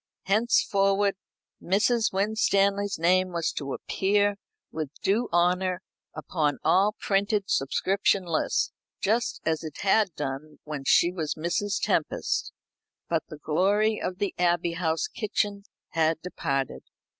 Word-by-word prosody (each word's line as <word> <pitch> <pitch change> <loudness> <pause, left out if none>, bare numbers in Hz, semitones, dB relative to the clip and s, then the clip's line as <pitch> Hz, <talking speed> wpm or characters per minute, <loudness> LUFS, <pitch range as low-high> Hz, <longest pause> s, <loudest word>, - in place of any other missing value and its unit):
Henceforward 200 -2 +2 0.5
Mrs. 220 +5 +2
Winstanley's 200 0 +1
name 185 +2 +2
was 170 -2 -1
to 140 -2 -5
appear 205 +6 +1 0.3
with 155 -3 -4
due 225 +5 +1
honour 180 +1 +1 0.3
upon 150 -5 -1
all 200 +3 +3
printed 200 0 0
subscription 195 +7 +1
lists, 165 -2 0 0.3
just 225 +4 0
as 160 0 0
it 155 -2 -7
had 195 -3 +2
done 145 +1 -5
when 150 -3 -6
she 170 +5 +4
was 160 -5 -3
Mrs. 180 +6 -1
Tempest; - - 0 0.6
but 165 -1 -1
the 155 - -8
glory 200 +8 +1
of 180 - -3
the 200 0 -2
Abbey 175 -1 +2
House 165 -2 0
kitchen 205 -2 -2 0.2
had 160 -1 +1
departed. 135 - -2
185 Hz, 120 wpm, -27 LUFS, 160-200 Hz, 0.6 s, she